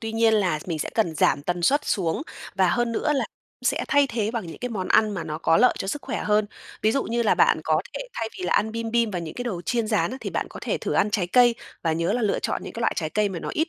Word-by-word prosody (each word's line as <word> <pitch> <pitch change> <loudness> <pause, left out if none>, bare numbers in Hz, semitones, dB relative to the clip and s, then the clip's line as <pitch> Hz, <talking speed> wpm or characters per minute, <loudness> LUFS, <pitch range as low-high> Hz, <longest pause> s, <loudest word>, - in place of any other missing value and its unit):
tuy 225 -1 -4
nhiên 225 0 +4
là 185 -7 +2
mình 165 -3 -2
sẽ - - -3
cần 210 -8 +1
giảm 145 -1 +2
tần 175 +2 -2
suất 285 - +3
xuống, 175 - 0 0.3
và 190 -2 +3
hơn 240 +4 +1
nữa 300 +6 +1
là 275 - +1 0.4
sẽ - - +1
thay 285 0 +4
thế 220 -5 -1
bằng 230 -5 -4
những 165 - -9
cái 250 - -3
món 195 -6 -4
ăn 215 -1 +4
mà 180 - -4
nó 155 0 -4
có 165 - +3
lợi 250 - +5
cho 195 - -3
sức 290 +8 -3
khỏe - - -3
hơn. 210 0 +2 0.4
Ví 220 - +3
dụ 275 - +1
như 235 +1 0
là 220 - +3
bạn - - +4
có - - +2
thể - - -4
thay 225 - -2
vì 185 - -4
là 180 - +1
ăn 220 +1 +2
bim 230 0 -3
bim 235 -1 +2
và 185 - -2
những 165 -2 -6
cái 245 - -5
đồ 185 -8 -3
chiên 235 +1 0
rán, 215 -1 +1
thì - - -4
bạn - - -2
có - - -9
thể - - -1
thử - - -3
ăn 210 - +2
trái 205 -4 0
cây 240 +5 +5 0.3
và 165 - +1
nhớ 170 +4 0
là 245 - 0
lựa 210 - +1
chọn - - -2
những - - -7
cái 230 - -7
loại 230 - +2
trái 155 -2 -2
cây 210 +2 +1
mà 185 -3 -5
nó - - -6
ít 320 +2 0
215 Hz, 305 wpm, -24 LUFS, 180-235 Hz, 0.4 s, lợi